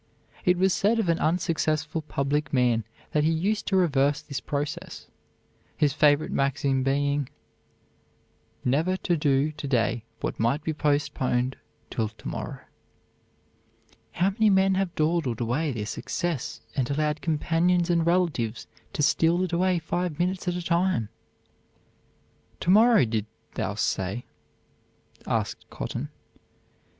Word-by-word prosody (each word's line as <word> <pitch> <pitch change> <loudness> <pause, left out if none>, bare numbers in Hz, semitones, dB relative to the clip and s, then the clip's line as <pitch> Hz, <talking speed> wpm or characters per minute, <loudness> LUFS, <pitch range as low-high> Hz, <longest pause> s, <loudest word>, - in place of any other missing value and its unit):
It 180 0 +4
was 190 +1 +3
said 215 +4 +2
of 215 -6 0
an 165 - +2
unsuccessful 160 -2 0
public 145 -1 -1
man 120 -4 +2 0.3
that 150 - +2
he 155 - +3
used 195 +7 0
to 195 - +1
reverse 145 -6 +3
this 140 -3 -5
process, 145 0 -4 0.7
his 145 -2 +2
favorite 145 0 +3
maxim 135 -1 +1
being 140 +1 0 1.4
"never 160 +9 +2
to 175 -2 0
do 145 -1 +2
to 150 -1 -7
day 120 -3 +1 0.2
what - - -3
might 125 +7 +1
be 160 - -1
postponed 135 -4 0 0.4
till 110 -2 -1
to 110 - -11
morrow." - - -5 1.5
How 185 +3 +2
many 215 +1 +3
men 190 0 +4
have 190 -2 -1
dawdled 155 -7 0
away 130 +6 0
their 110 -4 -3
success 155 +6 -3
and 130 -3 0
allowed 150 +1 0
companions 170 +2 +1
and 170 -1 +3
relatives 160 -11 0 0.3
to 150 - 0
steal 165 +4 +3
it 180 -2 -3
away 180 +1 +2
five 170 0 -2
minutes 180 +2 -1
at 175 - 0
a 180 - -3
time! 170 - +1 1.5
"To 175 - +2
morrow, 220 - +6
didst 110 -1 -2 0.2
thou - - -2
say?" 95 +6 -1 1.0
asked - - -2
Cotton. - - -5
155 Hz, 135 wpm, -26 LUFS, 135-175 Hz, 1.5 s, morrow